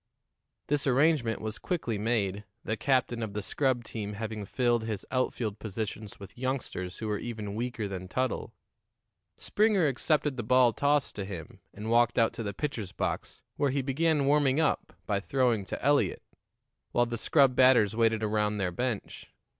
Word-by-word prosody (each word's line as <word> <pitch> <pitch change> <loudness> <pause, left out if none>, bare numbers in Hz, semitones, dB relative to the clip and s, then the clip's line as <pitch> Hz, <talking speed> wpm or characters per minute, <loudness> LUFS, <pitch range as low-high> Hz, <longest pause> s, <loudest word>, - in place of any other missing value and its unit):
This 145 -1 0
arrangement 135 -3 +2
was 110 0 -4
quickly 125 - -2
made, 105 -3 0 0.2
the 110 - -1
captain 125 -1 +1
of 110 -3 -4
the 105 - -2
scrub 130 +1 0
team 105 -2 -5
having 110 0 -5
filled 120 +1 +1
his 110 -3 -4
outfield 120 -5 -1
positions 110 -1 -5
with 100 +4 -12
youngsters 125 -9 -3
who 110 - -4
were 105 -1 -1
even 110 -4 -5
weaker 115 -1 -3
than 95 -2 -6
Tuttle. 130 +5 -2 0.9
Springer 210 -4 +2
accepted 145 0 +1
the - - -1
ball 125 +1 +4
tossed 145 +2 +1
to 100 - -2
him, 90 -5 -8
and 110 +2 -5
walked 120 0 +4
out 115 -2 +3
to - - -6
the 105 -2 -2
pitcher's 110 -5 -4
box, - - -4
where 145 - +2
he 135 0 0
began 145 +2 +1
warming 145 0 +3
up 160 - +1
by 100 -2 0
throwing 120 -2 +1
to - - -5
Eliot, 145 0 +2 0.7
while 120 - +3
the 120 0 -4
scrub 135 0 +4
batters 125 -5 +5
waited 115 -1 +2
around 105 0 +1
their 95 -3 -1
bench. 120 +2 -4
115 Hz, 170 wpm, -29 LUFS, 105-135 Hz, 0.9 s, batters